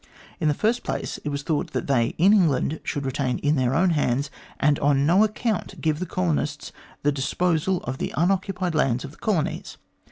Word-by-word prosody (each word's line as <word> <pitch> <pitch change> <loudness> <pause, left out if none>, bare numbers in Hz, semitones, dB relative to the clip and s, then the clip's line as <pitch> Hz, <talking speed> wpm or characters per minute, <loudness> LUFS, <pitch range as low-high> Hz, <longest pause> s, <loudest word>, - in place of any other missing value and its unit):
In 155 - +1
the 150 - +2
first 230 +7 +1
place, - - -4
it 150 - -5
was 140 0 -3
thought 150 -1 -2
that - - -2
they 120 -4 +1
in 190 +5 +5
England 160 -5 +2
should 140 -1 -3
retain 130 -1 -1
in 145 +1 +1
their 130 -1 +1
own 180 +2 +3
hands, 140 -2 0 0.3
and 145 0 +3
on 140 -1 +2
no 180 +7 +5
account 215 -1 -2
give 155 -1 0
the 185 - -3
colonists 155 -4 -2 0.3
the 145 - +3
disposal 165 +5 0
of 130 +2 -5
the - - -2
unoccupied 185 +1 0
lands 130 -5 +1
of 140 - -9
the - - -18
colonies. 185 -9 -2
150 Hz, 195 wpm, -24 LUFS, 140-180 Hz, 0.3 s, in